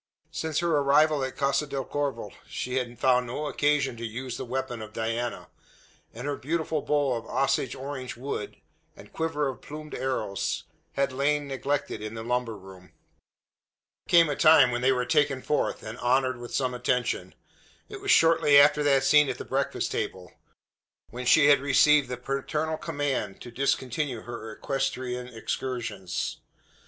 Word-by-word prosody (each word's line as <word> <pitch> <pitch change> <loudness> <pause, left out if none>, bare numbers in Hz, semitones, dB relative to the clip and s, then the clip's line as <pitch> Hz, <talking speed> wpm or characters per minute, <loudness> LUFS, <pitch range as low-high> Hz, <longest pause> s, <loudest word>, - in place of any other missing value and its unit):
Since 160 0 -2
her 170 -3 +2
arrival 145 +1 +3
at 130 - -4
Casa 140 +1 +1
del 135 -2 -3
Corvo 145 -1 -3 0.2
she 125 +1 -3
had 120 -2 -3
found 125 -1 +3
no 145 +6 -4
occasion 145 -3 +1
to 115 - -7
use 120 +3 -5
the - - -5
weapon 125 -2 -4
of 110 0 -9
Diana; 115 +2 -3 0.6
and 125 +4 -8
her 145 0 -1
beautiful 155 +3 -2
bow 145 -3 +1
of 115 -1 -5
Osage 135 -2 0
orange 130 -2 -6
wood, 125 -5 -5 0.4
and - - -15
quiver 160 -3 -1
of 130 -2 -5
plumed 150 +1 -9
arrows, 130 -7 -2 0.3
had 140 -1 0
lain 145 +2 0
neglected 140 -3 -2
in 110 +1 -6
the 110 - -5
lumber 120 -2 -1
room. 95 -1 -14 1.1
There - - -27
came 170 -1 +6
a 145 - -1
time 155 -5 +6
when 120 0 -2
they 130 +1 +4
were 125 -1 0
taken 140 -2 +1
forth, 150 - -1
and 110 +2 -7
honoured 130 +1 +2
with 120 0 -9
some 130 -2 0
attention. 125 0 -1 0.5
It 410 -2 -9
was 400 - -5
shortly 160 - +6
after 150 +1 +5
that 140 -2 +3
scene 150 -2 +5
at - - -3
the - - -7
breakfast - - -1
table; 90 -2 -4 0.8
when 125 +1 -5
she 155 - +6
had 145 -1 +6
received 140 0 +4
the 125 - -3
paternal 150 +5 -2
command 145 - -2
to 120 - -9
discontinue 130 0 -1
her 115 -2 -7
equestrian 125 -1 -3
excursions. 115 -4 -4
135 Hz, 165 wpm, -27 LUFS, 120-145 Hz, 1.1 s, came